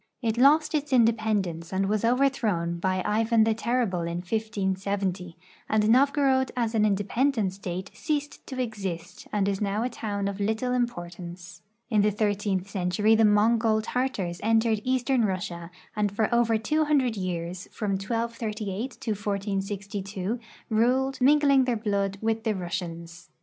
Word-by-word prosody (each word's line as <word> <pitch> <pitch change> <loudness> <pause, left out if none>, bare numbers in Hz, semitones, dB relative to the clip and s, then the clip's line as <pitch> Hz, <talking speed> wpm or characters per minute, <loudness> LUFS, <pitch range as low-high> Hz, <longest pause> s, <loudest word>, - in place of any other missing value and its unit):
It 225 -1 +1
lost 290 +6 +4
its 295 -1 -1
independence 215 -8 +1
and 195 +1 0
was 210 +1 0
overthrown 230 -9 +1
hy 185 -1 +1
Ivan 225 +1 +3
the 225 0 +2
Terrible 225 -5 0
in 170 0 -3
1570, 190 -3 -2 0.3
and 215 -1 +2
Novgorod 270 0 +3
as 230 -2 0
an 215 -1 +3
independent 205 +1 +1
State 190 0 -6
ceased 295 -2 -3
to 260 -2 -6
exist 195 -7 -5
and 200 -2 +1
is 195 0 -1
now 205 +2 0
a 250 - -1
town 205 -4 -3
of 200 0 -4
little 220 +5 0
importance. 175 -7 -4 0.3
In 215 -2 +4
the 210 - +4
thirteenth 205 -2 -1
century 200 +2 +1
the 225 0 +5
^Mongol 220 +1 +3
Tartars 215 -9 -2
entered 225 0 +2
eastern 255 -1 +1
Russia 180 -4 -3 0.3
and 210 -1 +1
for 215 +3 0
over 235 -1 +3
200 285 0 +1
years, 180 -2 -4
from 210 -3 -3
1238 220 +1 -3
to 225 - -2
1462, 200 0 -3 0.3
ruled, 255 +4 +2
mingling 280 -1 +5
their 245 -2 0
blood 200 -2 -1
with 225 0 0
the 220 -3 0
Russians. 170 -2 -6
215 Hz, 145 wpm, -26 LUFS, 190-235 Hz, 0.3 s, the